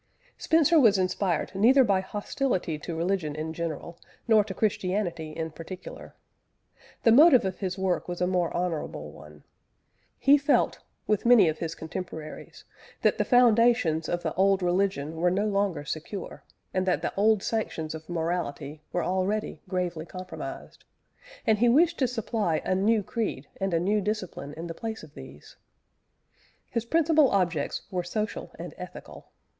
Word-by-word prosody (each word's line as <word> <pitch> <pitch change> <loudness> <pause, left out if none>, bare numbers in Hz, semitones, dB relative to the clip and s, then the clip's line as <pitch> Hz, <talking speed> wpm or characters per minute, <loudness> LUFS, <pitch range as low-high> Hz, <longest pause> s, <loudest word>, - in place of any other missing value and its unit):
Spencer 325 0 +4
was 220 -7 +5
inspired 185 -2 -1
neither 245 +8 +5
by 200 -5 +2
hostility 200 - -2
to 165 +2 -6
religion 170 -3 -1
in 155 +1 -4
general, 170 +1 -5 0.3
nor 220 -2 +5
to 200 - -6
Christianity 185 -5 -1
in 160 +1 -5
particular. 165 +4 -9 0.9
The 230 - +6
motive 275 -2 +7
of 190 -1 -3
his 185 -1 -3
work 190 -2 -1
was 175 -1 -5
a 180 - +2
more 180 -2 0
honourable 160 - -3
one. 75 +1 -14 0.7
He 285 +1 +5
felt, 285 +1 +2 0.3
with 210 -2 +1
many 235 -7 +7
of 155 - -4
his 165 -1 -4
contemporaries, 160 -1 -8 0.4
that - - +3
the - - +4
foundations 230 - +4
of 175 0 -2
the - - -2
old 195 0 +2
religion 175 -4 0
were 175 +2 +2
no 195 +4 0
longer 200 -7 0
secure, 170 +6 -6 0.3
and 185 0 0
that 180 - +1
the - - -2
old 210 0 +3
sanctions 165 -8 -2
of 160 +1 -9
morality 160 -3 -3
were 175 - -1
already 190 +3 -1
gravely 175 -3 -2
compromised; 185 0 -8 0.6
and 220 -2 +3
he 240 +1 +4
wished 315 +7 +4
to 260 - +3
supply 225 -8 -1
a - - +1
new 210 +3 +2
creed 210 - -3
and 195 0 -1
a 165 - +2
new 205 +5 +1
discipline 190 -8 -4
in 165 - -6
the 170 - -5
place 220 +2 -6
of 155 - -13
these. 65 +2 -13 1.1
His 230 -1 -2
principal 315 0 +4
objects 175 -7 0
were 180 -1 -1
social 210 +5 -4
and - - -7
ethical. - - -10
185 Hz, 160 wpm, -27 LUFS, 165-215 Hz, 1.1 s, motive